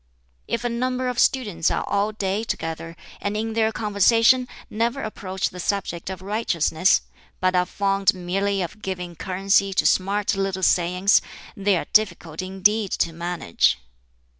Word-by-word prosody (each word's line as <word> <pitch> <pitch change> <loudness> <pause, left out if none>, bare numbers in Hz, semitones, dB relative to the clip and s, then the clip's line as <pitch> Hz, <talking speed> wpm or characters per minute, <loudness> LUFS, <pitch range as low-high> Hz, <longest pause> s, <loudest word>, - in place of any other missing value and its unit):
"If 235 - -2
a - - +1
number 255 +2 -1
of 245 - -3
students 205 -11 +2
are - - -1
all 205 +2 0
day 205 0 -2
together, 165 -5 -4 0.3
and 205 +1 -2
in 220 +1 -2
their 220 0 +2
conversation 225 +4 +3 0.2
never 235 +5 -1
approach 190 -3 -3
the 180 - -9
subject 180 -2 -2
of 185 -1 -7
righteousness, 190 -4 +2 0.4
but 185 0 +2
are 180 0 +2
fond 195 0 +1
merely 195 +2 -1
of 195 +5 -8
giving 180 -3 -5
currency 195 +3 +1
to - - +2
smart 200 +2 +2
little 195 -1 -2
sayings, 180 +3 +3 0.3
they 200 -1 +2
are - - -3
difficult 175 -6 +1
indeed 195 +3 +1
to 165 - 0
manage. 170 - 0
195 Hz, 150 wpm, -23 LUFS, 180-215 Hz, 0.4 s, conversation